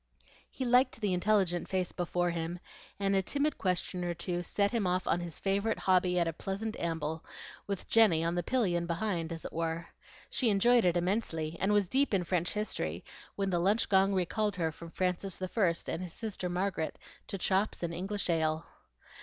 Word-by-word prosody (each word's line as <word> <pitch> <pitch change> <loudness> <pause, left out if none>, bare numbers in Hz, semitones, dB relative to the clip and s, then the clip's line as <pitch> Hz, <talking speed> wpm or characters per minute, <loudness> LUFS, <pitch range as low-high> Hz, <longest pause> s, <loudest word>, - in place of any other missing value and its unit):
He 260 - -4
liked 250 0 +4
the 205 -4 0
intelligent 180 -2 +2
face 185 -2 -1
before 175 0 0
him, 170 +1 -3 0.4
and 195 0 +2
a 195 - +4
timid 285 +9 0
question 180 -2 -1
or 175 -1 -2
two 175 +1 -3
set 200 +3 0
him 225 -6 0
off 180 +1 0
on 175 - +1
his 170 -3 -6
favorite 200 +3 0
hobby 180 -1 +3
at 170 -1 +3
a 165 - -1
pleasant 200 +6 -4
amble, 160 -1 -2 0.4
with 200 -2 -4
Jenny 205 -8 +5
on 170 +1 0
the 175 - 0
pillion 175 -6 0
behind, 170 -2 -1
as 165 -1 -5
it - - -6
were. 165 +1 -2 0.4
She 245 - +3
enjoyed 235 +3 +4
it 175 -1 +3
immensely, 170 -4 -1
and 195 +3 +2
was 205 -2 +3
deep 270 0 +2
in 185 - +1
French 175 0 0
history, 210 0 -2 0.3
when 195 -1 -1
the 175 - +2
lunch 200 +6 +2
gong 195 0 +4
recalled 205 +3 0
her 165 -3 0
from 165 +2 -10
Francis 180 +2 -1
I. 185 -2 +1 0.2
and 165 - -3
his 180 -2 -6
sister 205 -5 -4
Margaret 180 -2 -1 0.3
to 195 - -3
chops 190 +1 0
and 170 0 -2
English 195 +4 -3
ale. 160 -1 +1
185 Hz, 190 wpm, -31 LUFS, 170-200 Hz, 0.4 s, Jenny